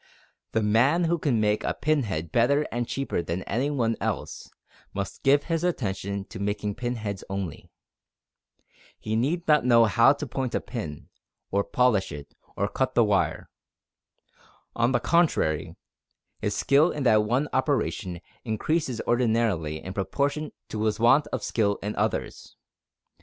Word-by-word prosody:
The 110 - +1
man 125 +11 +3
who 170 0 +1
can 135 -7 +1
make 105 0 +1
a - - -1
pin 155 -1 +1
head 80 -8 -4
better 140 - +3
and 120 0 -2
cheaper 135 -9 -2
than 85 +2 -4
any 125 +7 -1
one 115 -6 0
else, - - -4 0.5
must 100 0 -4
give 145 +1 +4
his 165 -1 -1
attention 100 - -2
to - - -8
making 105 +1 -2
pin 120 +3 -3
heads 100 -4 -5
only. 95 -5 -5 1.3
He 110 0 -3
need 155 +10 0
not 150 -3 +5
know 120 -2 +6
how 115 +6 +5
to 145 - -5
point 130 -1 -3
a - - +2
pin, 100 - -7 0.4
or 100 +1 +2
polish 125 -6 +2
it, 70 0 -9 0.2
or - - +1
cut - - -1
the - - +6
wire. - - 0 1.2
On 120 +2 +2
the 125 - +2
contrary 160 - +1 0.7
his - - -1
skill 145 +5 +4
in 150 - -3
that 110 -4 +5
one 125 +7 0
operation 120 - -1 0.2
increases 125 +3 -1
ordinarily 110 -10 0
in 95 - -6
proportion 140 +10 -1 0.2
to 110 0 -3
his 110 0 0
want 120 +6 +5
of - - -4
skill 100 -3 +1
in 105 +1 -3
others. - - -3
115 Hz, 155 wpm, -26 LUFS, 100-140 Hz, 1.3 s, know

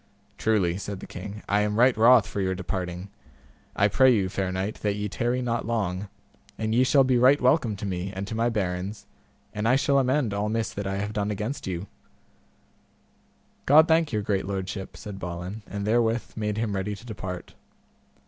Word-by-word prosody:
Truly, 95 -6 +1
said 100 -1 -5
the - - -8
king, 100 +3 -8
I 100 - +2
am 105 0 0
right 125 +2 +5
wroth 115 0 +6
for 100 - -4
your 95 -1 0
departing; 90 0 -4 0.6
I 100 - +4
pray 130 +5 +5
you, 100 -6 +2
fair 95 -1 -2
knight, 95 +3 -3
that 105 -1 0
ye 105 0 -2
tarry 120 +5 -1
not 120 -2 -2
long, 100 -4 -2 0.5
and 110 0 -1
ye 125 +2 +4
shall 135 +1 +5
be 130 -2 +2
right 135 +4 +6
welcome 125 -4 +2
to 100 +1 -6
me, 95 0 -3
and 100 0 -5
to 110 - -6
my 115 +2 +1
barons, 95 -1 -3 0.5
and 105 +1 -1
I 125 - +5
shall 140 0 +3
amend 130 -4 +1
all 105 +1 -1
miss 115 0 -1
that 100 -1 -4
I 95 - -2
have 105 +2 -3
done 105 -1 -1
against 105 +6 -4
you; 90 0 -3 1.8
God 155 +3 +7
thank 160 -2 +3
your 105 -2 -1
great 100 -2 -1
lordship, 95 0 -5
said 100 -2 -8
Balin, 90 +4 -5
and 100 -1 -4
therewith 115 +1 +1
made 105 -1 -2
him 110 -2 -1
ready 100 +2 -2
to 105 - -14
depart. 95 -5 -7
105 Hz, 195 wpm, -26 LUFS, 95-115 Hz, 1.8 s, God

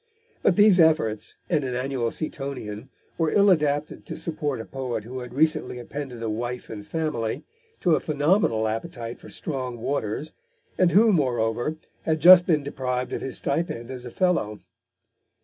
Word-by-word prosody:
But 180 - +3
these 205 -2 +6
efforts, 155 -10 +2
and 155 -5 +1
an 130 -2 -3
annual 125 -2 -1
Seatonian, 135 -6 -5 0.3
were 165 -1 +2
ill 200 +4 +5
adapted 150 -3 0
to - - -6
support 150 -5 -3
a 115 - -6
poet 125 -5 -4
who 125 +4 -6
had 125 -1 -8
recently 145 -2 +1
appended 125 -1 -6
a - - -1
wife 120 +3 -4
and 105 -2 -7
family 150 -7 -2 0.4
to 175 -4 +4
a - - +1
phenomenal 145 - +2
appetite 115 +1 -5
for - - -13
strong 130 -5 -4
waters, 135 +3 -3 0.4
and 180 -2 +3
who, 215 +5 +5
moreover, 120 -2 0 0.3
had 160 -1 0
just 175 +2 +9
been 155 -5 +2
deprived 130 -2 -3
of - - -3
his 135 - -3
stipend 140 -5 -2
as 125 -2 -6
a 125 - -7
fellow. 120 - 0
135 Hz, 165 wpm, -25 LUFS, 120-160 Hz, 0.4 s, just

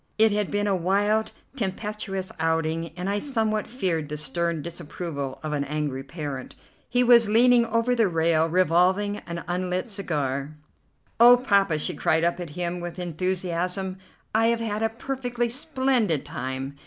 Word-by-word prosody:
It 220 0 +5
had 205 -1 0
been 205 0 0
a 200 -2 +2
wild, 205 +5 +1 0.2
tempestuous 200 -3 -3
outing, 165 0 0
and 180 +1 -3
I 200 +1 0
somewhat 220 -5 0
feared 175 - -2
the 150 - -4
stern 160 +2 -1
disapproval 150 -4 -5
of 155 -1 -3
an 145 -1 0
angry 145 -2 -3
parent. 140 -3 -6 0.3
He 245 +1 +3
was 235 -3 +6
leaning 235 +1 +5
over 230 +2 +1
the 230 -4 +3
rail 165 -1 +2
revolving 185 +4 +2
an 170 0 -5
unlit 180 +5 -2
cigar. 145 -7 -2 0.6
"Oh, 240 +1 +9
Poppa!" 200 -9 +2
she 150 - -1
cried 160 +1 +1
up 170 +1 +1
at 175 -2 -5
him 175 0 -2
with 175 0 -6
enthusiasm, 180 +1 -2 0.3
"I 225 +1 +3
have 235 0 +2
had 215 -2 -2
a 225 - +2
perfectly 245 0 -3
splendid 260 - +1
time. 135 -2 -5
185 Hz, 155 wpm, -25 LUFS, 160-220 Hz, 0.6 s, Oh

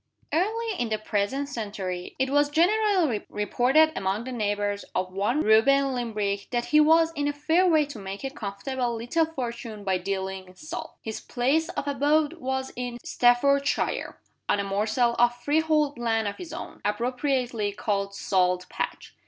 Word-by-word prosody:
EARLY 445 +7 0
in 240 - -1
the 215 - 0
present 215 +6 -1
century 200 -8 -5
it 265 0 0
was 290 0 +3
generally 355 - +2
reported 255 +9 +3
among 195 +3 -1
the 260 - -6
neighbors 205 -3 -1
of 185 0 -1
one 210 +10 +1
Reuben 270 +5 +4
Limbrick 210 -5 -2
that 240 -1 -1
he 305 - +4
was 325 +2 +5
in 290 -2 -1
a 290 - 0
fair 320 +6 +2
way 310 -4 +4
to 280 -6 -9
make 195 +2 -7
a 270 - -3
comfortable 240 +2 -3
little 240 +8 0
fortune 235 -7 -6
by 190 -2 0
dealing 190 0 -4
in 185 - -16
Salt. 315 - -7
His 220 -1 -4
place 275 +6 0
of 285 - -4
abode 290 +2 +2
was 265 0 -3
in 245 -1 -4
Staffordshire, 280 +4 +2 0.3
on 205 - +3
a - - 0
morsel 215 +5 +1
of 240 0 +4
freehold 300 +1 +1
land 225 -2 0
of 200 - -4
his 345 -3 -8
own - - -8
appropriately 245 0 -1
called 200 -1 -2
Salt 180 -2 +1
Patch. - - -5
245 Hz, 165 wpm, -26 LUFS, 205-290 Hz, 0.3 s, was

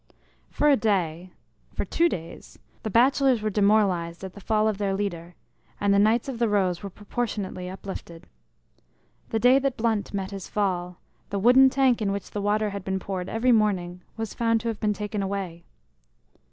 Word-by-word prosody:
For 295 - +1
a 290 - +6
day 185 -6 -1 0.4
for - - -2
two 340 +1 +2
days 165 - -8 0.2
the 220 - -4
bachelors 255 +1 +3
were 215 - 0
demoralized 195 -5 +2
at 190 -1 -7
the 200 - -12
fall 215 +2 +1
of 210 -2 -1
their 195 -2 0
leader, 175 -4 -4 0.4
and 200 0 +2
the 200 - +4
Knights 220 +4 +3
of 255 -4 -5
the 235 -2 +2
Rose 185 -4 +1
were 200 - -6
proportionately 205 -3 -4
uplifted. 185 -3 -8 1.0
The 225 - 0
day 250 +4 +5
that 275 -2 -1
Blunt 220 -2 0
met 195 -1 -4
his 195 -2 -7
fall, 180 -3 -1 0.3
the 200 - -2
wooden 250 +6 +6
tank 260 -3 +2
in 200 -2 0
which 200 0 -5
the 205 - -3
water 210 +1 +1
had 200 -1 -6
been 190 0 -2
poured 190 -1 -4
every 235 +3 +2
morning 185 -6 +1 0.2
was 225 -1 -4
found 230 -1 +1
to 230 - -2
have 220 -2 -4
been 210 -1 +1
taken 210 0 -4
away. 190 -4 -4
205 Hz, 185 wpm, -25 LUFS, 190-225 Hz, 1.0 s, a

